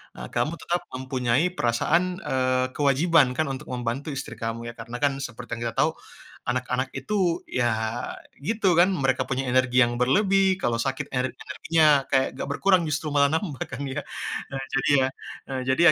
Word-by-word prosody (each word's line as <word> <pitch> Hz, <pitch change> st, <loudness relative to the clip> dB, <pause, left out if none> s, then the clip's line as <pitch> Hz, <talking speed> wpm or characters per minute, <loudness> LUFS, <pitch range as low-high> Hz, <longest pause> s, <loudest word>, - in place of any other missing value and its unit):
eee, -, -, -7 dB
kamu 155 Hz, -, +1 dB
tetap 175 Hz, +1 st, -1 dB
mempunyai 130 Hz, +2 st, 0 dB
perasaan, 120 Hz, +9 st, +2 dB, 0.2 s
eee, 130 Hz, 0 st, +1 dB
kewajiban 145 Hz, +1 st, +4 dB
kan 155 Hz, -, +2 dB
untuk 130 Hz, -, -8 dB
membantu 125 Hz, +3 st, -3 dB
istri 135 Hz, -, -5 dB
kamu 115 Hz, +1 st, -4 dB
ya. -, -, -8 dB
Karena 115 Hz, +2 st, -6 dB
kan 140 Hz, -1 st, +2 dB
seperti 120 Hz, +1 st, -11 dB
yang -, -, -8 dB
kita 115 Hz, -, -5 dB
tahu -, -, +4 dB, 0.5 s
anak-anak 125 Hz, +1 st, -1 dB
itu 180 Hz, -5 st, 0 dB
ya 120 Hz, -1 st, 0 dB, 0.7 s
gitu 195 Hz, +3 st, +1 dB
kan, 175 Hz, +3 st, +5 dB
mereka 135 Hz, -4 st, +1 dB
punya 135 Hz, 0 st, -1 dB
energi 130 Hz, 0 st, +2 dB
yang 120 Hz, -, -2 dB
berlebih 190 Hz, +7 st, +3 dB
kalau 120 Hz, -10 st, 0 dB
sakit 135 Hz, +2 st, -2 dB
ener 130 Hz, 0 st, 0 dB
energinya 165 Hz, -1 st, +1 dB, 0.2 s
kayak 135 Hz, 0 st, +2 dB
gak 135 Hz, -, -5 dB
berkurang 185 Hz, +5 st, +3 dB
justru 150 Hz, 0 st, -2 dB
malah 140 Hz, -1 st, +4 dB
nambah 160 Hz, -2 st, -2 dB
kan 135 Hz, +1 st, -6 dB
ya. 135 Hz, +2 st, -3 dB, 0.5 s
Nah, 135 Hz, -1 st, -4 dB
jadi 135 Hz, -, +1 dB
ya 130 Hz, -1 st, +3 dB, 0.6 s
jadi 130 Hz, -, +2 dB
135 Hz, 170 wpm, -25 LUFS, 125-160 Hz, 0.7 s, kan